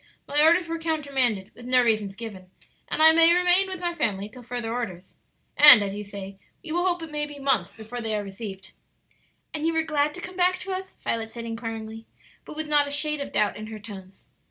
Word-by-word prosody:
"My 290 +1 +2
orders 335 +3 +4
were 330 0 -4
countermanded, 275 -11 -1
with 240 0 -12
no 255 0 +4
reasons 215 -4 0
given, 200 -4 -9 0.4
and 310 - +1
I 320 - +9
may 330 +1 +6
remain 360 +2 +4
with 375 -1 -6
my 350 -1 -2
family 205 - -2
till 250 +3 -13
further 240 -1 -5
orders; 190 -7 -6 0.4
and, 290 -7 +9
as 195 -1 -4
you 210 - -5
say, 195 -1 -9 0.2
we 325 - -8
will 350 +3 0
hope 350 -2 -1
it 320 - -9
may 295 0 -2
be 290 -1 -11
months 275 -2 0
before 225 +2 -8
they 220 -1 -2
are 210 - -2
received." 195 -1 -9 0.8
"And 310 +1 -2
you 330 - 0
were 320 0 +1
glad 300 -1 0
to - - -8
come 370 +1 -9
back 365 0 +2
to 385 - -5
us?" 375 0 -7
Violet 225 -1 -2
said, 230 0 -8
inquiringly, 225 -1 -7 0.4
but - - -10
with 310 0 -5
not 295 -1 +3
a - - -5
shade 295 +1 +2
of 280 - -6
doubt 210 - +1
in 215 0 -8
her 220 0 -8
tones. 195 -3 -12
250 Hz, 230 wpm, -25 LUFS, 215-320 Hz, 0.8 s, I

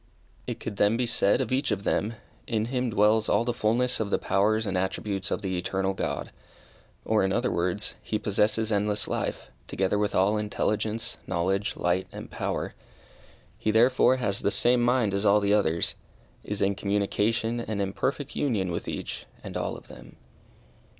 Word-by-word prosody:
It - - -4
could 100 - -6
then 105 +3 +3
be 125 - +1
said 115 0 +3
of 130 - -3
each 135 +2 +1
of 100 -3 -1
them, 110 +3 0 0.3
in 110 -2 0
him 125 -1 0
dwells 110 +1 +3
all 115 - +3
the 120 - 0
fulness 120 +2 +1
of 110 -2 -1
the - - +2
powers 110 +3 +1
and 100 -2 -2
attributes 95 0 -1
of - - -2
the 95 -1 -1
Eternal 95 +2 -1
God, - - -3 0.7
or, 110 -2 +2
in 95 - +1
other 120 +5 +1
words, 90 +4 -1
he 110 - -2
possesses 105 +2 +1
endless 105 0 0
life, - - -3 0.2
together 95 +2 0
with 105 0 0
all 100 +3 +3
intelligence, 105 +2 -2
knowledge, 95 +3 0
light, 90 +2 0
and - - -9
power. - - -3 0.9
He - - -1
therefore 125 +4 +5
has 100 -6 0
the - - +1
same 120 +3 +3
mind 120 -4 +2
as 100 +1 0
all 105 0 +5
the 100 0 +2
others 85 -5 +2 0.5
is 105 -1 -2
in 100 +1 +2
communication 105 +4 0
and 110 -3 -3
in 100 -1 -1
perfect 140 +4 -2
union 105 -10 0
with 85 - -4
each - - -5 0.2
and - - -7
all - - -2
of - - -15
them. - - -13
105 Hz, 180 wpm, -27 LUFS, 100-115 Hz, 0.9 s, therefore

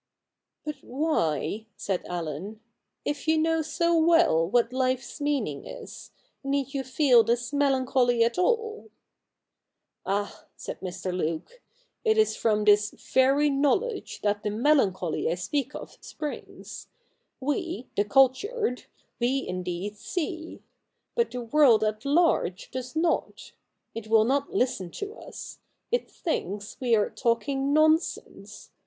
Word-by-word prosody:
' - - -60
But 300 -2 -4
why,' 225 - -1
said 190 -3 -2
Allen, 175 +5 -5 0.2
' - - -54
if 290 +1 -3
you 320 0 +4
know 325 +1 +2
so 335 +2 +1
well 325 - +4
what 240 +2 +2
life's 255 +1 -1
meaning 270 - -1
is, - - -9 0.3
need 275 0 -1
you 275 -1 -2
feel 260 -2 +4
this 240 +3 -1
melancholy 260 -4 +2
at 235 +6 0
all? 450 +2 0 0.4
' - - -59 0.2
' - - -58
Ah! 205 +1 -2
' - - -48
said - - -7
Mr. 185 0 -4
Luke, 170 - -3 0.2
' - - -46
it 440 -1 +3
is 435 0 +3
from 215 -2 +1
this 210 0 +5 0.2
very 275 +3 +4
know 275 -1 +3
ledge 475 -4 -5
that 205 0 +1
the 210 - -2
melancholy 205 - +1
I - - 0
speak 240 +10 -2
of - - -9
springs. 300 -2 -7 0.5
We 295 +1 -2
— - - -43
the 205 - +3
cultured 270 - +2 0.2
— - - -43
we 260 +3 0
indeed 180 +3 -4
see. 330 - -5 0.5
But 470 -1 +1
the 250 -1 -5
world 235 -3 +5
at 215 +2 -2
large 280 - +1
does 255 +2 -6
not. 330 +1 -1 0.4
It 225 -1 -7
will 220 0 +5
not 275 +3 0
listen 220 -8 0
to 405 +1 -5
us. - - -10 0.3
It 485 0 0
thinks 205 - -4
we 245 -3 +3
are 210 -2 +1
talking 270 +3 0
nonsense. 310 +2 0
260 Hz, 150 wpm, -27 LUFS, 210-310 Hz, 0.5 s, this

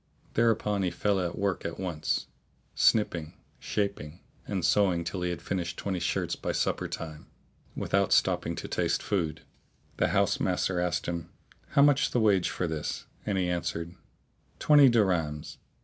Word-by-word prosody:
Thereupon 110 -3 +2
he 95 - +1
fell 100 +2 0
to 85 -2 -2
work 100 -2 -1
at 85 - -5
once, 85 -5 -2 0.5
snipping, 85 -8 +2 0.2
shaping 100 -6 -3 0.3
and 95 -5 -1
sewing 90 -2 +3
till 90 +2 -4
he 90 - 0
had 85 - -5
finished 85 -3 -3
twenty 95 -3 -2
shirts - - -1
by - - -3
supper - - 0
time, 80 -2 -7 0.5
without - - +1
stopping - - +2
to - - -6
taste - - 0
food. 85 -6 -1 0.6
The - - +2
house - - +2
master 90 -2 0
asked 90 -1 -1
him, 85 -1 -4 0.5
"How 140 - +7
much 145 -1 +4
the 125 - 0
wage 100 -5 +3
for 90 - -2
this?"; 80 -2 -4 0.2
and 100 -2 0
he 90 -1 +1
answered, 85 -1 -2 0.6
"Twenty 145 -3 +6
dirhams." 90 -10 0
90 Hz, 155 wpm, -28 LUFS, 85-100 Hz, 0.6 s, How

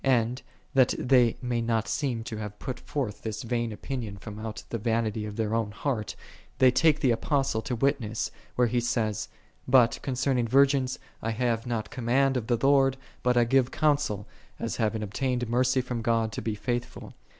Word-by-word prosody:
And, 125 -1 +2 0.3
that 130 -2 +4
they 125 -2 +3
may 120 -1 0
not 115 -1 0
seem 125 -6 -1
to 110 -1 -6
have 105 -1 -6
put 130 +2 -5
forth 125 -8 -4
this 110 -1 -4
vain 120 -1 -1
opinion 110 -2 -5
from 105 +1 -8
out 110 0 -6
the 115 - -3
vanity 110 -1 -1
of 105 - -7
their 110 -1 -1
own 115 -2 0
heart, 110 0 -3 0.4
they 130 -1 +6
take 155 +3 +3
the 130 -5 +4
Apostle 135 -1 0
to 125 - -3
witness, 120 -4 0 0.2
where 125 - +4
he 120 +1 +1
saith, 115 -4 -1 0.2
" - - -36
But 120 -2 +4
concerning 130 -2 0
virgins 135 +1 +3 0.2
I 115 - -2
have 115 +1 -1
not 115 -3 -3
command 130 +3 +2
of 120 -3 -2
the 120 - +2
Lord, 135 -1 +4 0.2
but 125 0 +2
I 120 - +6
give 130 +1 +3
counsel, 145 -10 +1 0.3
as 115 - -3
having 110 -1 0
obtained 120 +3 -1
mercy 130 +2 +2
from 125 -2 -4
God 115 -1 +1
to - - -5
be 110 -2 -2
faithful. 120 +2 -4
120 Hz, 185 wpm, -27 LUFS, 110-130 Hz, 0.4 s, they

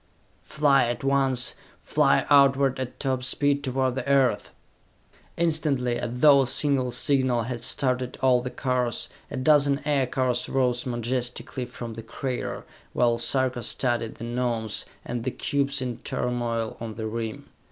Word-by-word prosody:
"Fly 140 -4 +3
at 120 +2 -3
once! 135 -2 +1 0.3
Fly - - +2
outward 140 -1 +4
at 130 -1 -5
top 130 -2 -1
speed 145 +2 +2
toward 130 -1 0
the 130 +1 -4
Earth!" 135 -3 +2 0.9
Instantly, 150 -7 +1
as 120 - -3
though 140 +3 +6
a 130 - 0
single 130 -1 +1
signal 125 -1 +2
had 120 0 -5
started 125 -2 -1
all 125 -2 +3
the 125 - -4
cars, 125 -2 -1 0.2
a 140 - -5
dozen 140 +1 +3
aircars 130 -3 0
rose 125 -2 0
majestically 125 +1 -3
from 120 -2 -7
the 115 - -7
crater, 115 - -5 0.3
while 120 -1 +2
Sarka 130 0 +1
studied 120 0 -1
the - - -9
Gnomes 120 -3 -2 0.2
and 120 -1 -4
the 130 - -1
cubes 140 0 -1
in 125 -2 -4
turmoil 120 -2 -2
on 115 -2 -6
the 110 +1 -5
rim. 110 0 -5
125 Hz, 145 wpm, -25 LUFS, 120-135 Hz, 0.9 s, though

